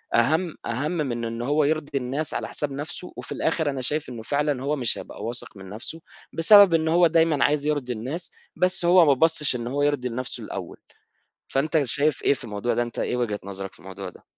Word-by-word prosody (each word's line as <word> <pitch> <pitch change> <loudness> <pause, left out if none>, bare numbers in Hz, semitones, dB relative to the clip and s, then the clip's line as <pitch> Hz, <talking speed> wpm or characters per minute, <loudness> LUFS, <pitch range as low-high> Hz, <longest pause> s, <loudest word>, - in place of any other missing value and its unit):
أهم 160 +8 +2
أهم 125 +6 -2
من 130 -9 -2
إن 115 +1 -4
هو 145 +5 +2
يرضي 145 -1 -1
الناس 135 +4 -2
على - - -3
حساب 145 -2 -3
نفْسه 150 +5 -6
وفي - - -8
الآخر 160 -2 0
أنا 135 -2 -4
شايف 150 +3 -2
إنه 120 -3 -7
فعلًا 145 +1 -1
هو 145 +2 0
مش 125 -6 0
هيبقى - - -9
واثق 115 -2 -3
من 95 -1 -10
نفْسه، 115 +10 -5 0.3
بسبب 200 +2 +7
إن 160 -1 +2
هو 170 +1 +5
دايمًا 160 -3 +3
عايز 145 -1 +1
يرضي 145 -5 -1
الناس 135 +11 -5 0.2
بس 180 -1 +2
هو 175 0 +7
ما 145 - +5
بَصّش 150 -1 +2
إن 120 0 -5
هو 140 +3 -2
يرضي 145 -4 0
لنفْسه 125 +2 -4
الأول، - - -7 0.7
فأنت 150 +3 +1
شايف 145 +2 +2
إيه - - +4
في 130 - -11
الموضوع 105 +2 -2
ده؟ 120 - +1
أنت 120 -1 -7
إيه - - -1
وجهة 110 -4 -2
نظرك 95 0 -6
في - - -19
الموضوع 95 0 -8
ده؟ - - -19
140 Hz, 215 wpm, -24 LUFS, 120-155 Hz, 0.7 s, بسبب